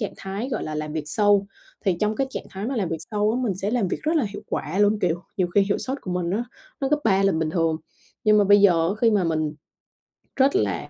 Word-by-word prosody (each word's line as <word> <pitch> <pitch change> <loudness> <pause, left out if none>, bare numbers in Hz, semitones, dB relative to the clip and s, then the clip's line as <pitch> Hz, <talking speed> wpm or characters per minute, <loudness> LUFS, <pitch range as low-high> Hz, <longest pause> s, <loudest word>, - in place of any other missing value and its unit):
trạng 210 - -3
thái, 200 +7 -5
gọi - - -2
là, 155 - -4
làm 150 0 -4
việc 155 -2 -3
sâu. 205 +2 +3 0.4
Thì 185 -3 +2
trong 210 +1 +1
cái 270 - 0
trạng - - -5
thái 195 +3 -5
mà 265 0 -2
làm 190 -6 0
việc 165 - -2
sâu 210 +1 +1
á 245 - -1
mình 205 -6 0
sẽ 195 +3 -3
làm 230 -6 +1
việc - - -2
rất 320 +2 +1
là 280 - +2
hiệu 205 - -8
quả 170 +7 -2
luôn, 205 +1 +3
kiểu, 175 -1 0 0.2
nhiều 180 - +3
khi 200 - +6
hiệu 200 +1 0
sốt 265 +2 -3
của 185 - -5
mình 180 -1 -1
á 225 +5 -1 0.4
nó 270 - 0
gấp 300 0 +2
3 195 -3 +3
là 195 - +3
bình 160 -1 -1
thường. 165 -1 +1 0.5
Nhưng 215 0 +5
mà 205 - +5
bây 205 +1 +6
giờ 170 -4 +4
á 200 - -1
khi 230 -1 +5
mà 200 -4 +2
mình 155 -2 -1 0.8
rất 275 +6 +3
là - - 0
200 Hz, 275 wpm, -24 LUFS, 175-220 Hz, 0.8 s, khi